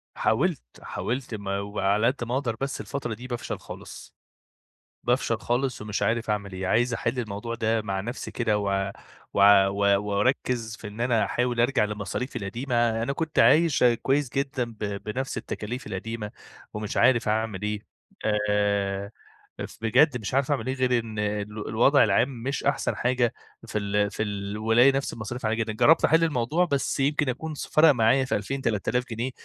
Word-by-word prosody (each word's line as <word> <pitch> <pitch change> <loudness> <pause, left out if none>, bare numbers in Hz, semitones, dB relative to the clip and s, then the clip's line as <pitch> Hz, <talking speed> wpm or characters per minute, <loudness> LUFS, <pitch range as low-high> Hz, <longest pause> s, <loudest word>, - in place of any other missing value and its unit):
حاولت، - - +1 0.2
حاولت 120 -1 -4
ما 100 -1 -3
وعلى 100 +2 +1
قدّ 130 0 -1
ما 120 +1 -4
أقدر، 130 -4 -1
بس 135 0 -2
الفترة 135 -5 -4
دي 120 +4 -8
بافشل 120 -2 -4
خالص، - - -10 0.9
بافشل - - +1
خالص، 125 -1 -1
ومش 105 -1 -3
عارف 115 0 0
أعمل 100 -2 -2
إيه، 95 0 -4
عايز 120 +5 +2
أحل 115 +2 -2
الموضوع 115 0 -4
ده 110 -1 0
مع 95 -2 -2
نفسي 120 +6 -5
كده 115 -3 0
و 100 -1 -1 0.4
و - - +1 0.3
و 100 0 +2
وأركز 110 +2 0
في 105 - -8
إن 105 +2 -10
أنا 120 -2 +2
أحاول 125 -1 0
أرجع 120 -2 +3
لمصاريفي 105 +4 -4
القديمة، 115 +2 0
أنا 140 - -1
كنت 160 +2 -3
عايش 160 -2 +5
آآ 120 -1 +6
كويس 135 +2 0
جدًا 135 -2 -1
ب 115 -2 -12 0.2
بنفس 130 +5 -4
التكاليف 120 +5 -5
القديمة 105 +2 -5 0.4
ومش 105 0 -4
عارف 120 -4 +4
أعمل 110 -2 -1
إيه 105 0 -2 0.7
آآ، 100 -1 0 0.6
ف - - -15
بجد 125 +5 +4
مش 105 - -5
عارف 135 +2 +1
أعمل 140 -2 -1
إيه، 130 - 0
غير 125 -2 +2
إن 110 -2 -6
ال 105 0 -3
الوضع 120 +6 +5
العام 115 +4 +1
مش 135 +3 -2
أحسن 140 - 0
حاجة 120 -1 +1 0.3
في - - -3
ال 100 0 0
في 110 - -2
الولاية، 110 +5 +2
نفس 135 - -2
المصاريف 115 +2 -6
عالية 110 +1 +1
جدا، 110 -1 -1
جربت 155 +9 +5
أحل 160 +1 +4
الموضوع 155 +3 +1
بس 140 -6 -1
يمكن 145 +1 +1
أكون 155 +5 -4
س - - -5
فرق 160 +1 +5
معايا 130 +1 +3
في - - 0
2000 135 +7 -3
3000 115 +1 0
جنيه، 120 +3 -3
115 Hz, 175 wpm, -26 LUFS, 105-130 Hz, 0.9 s, آآ